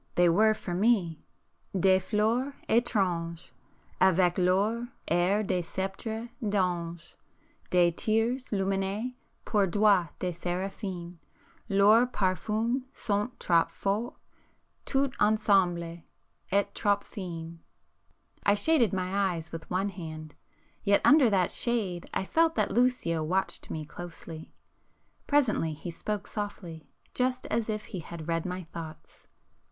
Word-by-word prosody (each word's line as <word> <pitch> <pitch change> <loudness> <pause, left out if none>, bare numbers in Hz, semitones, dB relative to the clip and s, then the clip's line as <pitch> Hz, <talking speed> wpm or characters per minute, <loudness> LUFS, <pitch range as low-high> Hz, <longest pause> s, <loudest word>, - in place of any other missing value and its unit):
—they 175 0 +5
were 215 +5 +4
for 180 - -5
me 185 -5 +2 0.6
"des 190 +1 +5
fleurs 230 +7 0
étranges,3 180 -8 0 0.5
Avec 185 -1 +4
leurs 205 +6 +2 0.2
airs 185 +5 +2
de 185 -2 0
sceptres 195 +6 -4
d'anges; 175 -5 -1 0.6
De 175 -1 +4
thyrses 225 +8 0
lumineux 195 +4 -1 0.3
pour 205 -3 +2
doigts 200 -3 +3
de 180 - -2
séraphins,— 180 0 -4 0.5
Leurs 210 +5 +5
parfums 220 +4 0
sont 210 -3 -1
trop 170 -1 +3
forts, 210 +5 -2 0.7
tout 275 -1 +1
ensemble, 190 -6 +2 0.5
et 200 0 +3
trop 205 -1 +2
fins!" 170 -3 -7 0.8
I 200 - +4
shaded 235 - +3
my 190 0 0
eyes 160 -1 -7
with 165 -1 -8
one 190 +3 0
hand,—yet 165 +3 -4
under 290 -5 +7
that 185 -4 +2
shade 205 -8 -1
I - - -1
felt 325 +7 +2
that - - +1
Lucio 240 -10 +1
watched 185 +5 -1
me 155 -1 -4
closely. 165 0 -9 0.8
Presently 235 - +2
he 165 +3 -7
spoke 205 +4 -4
softly, 180 -8 -6 0.2
just 255 0 0
as 225 0 0
if 215 0 -3
he 190 - -6
had 165 -1 -8
read 165 +1 -1
my 180 0 -4
thoughts. 160 -1 -10
195 Hz, 120 wpm, -29 LUFS, 175-215 Hz, 0.8 s, under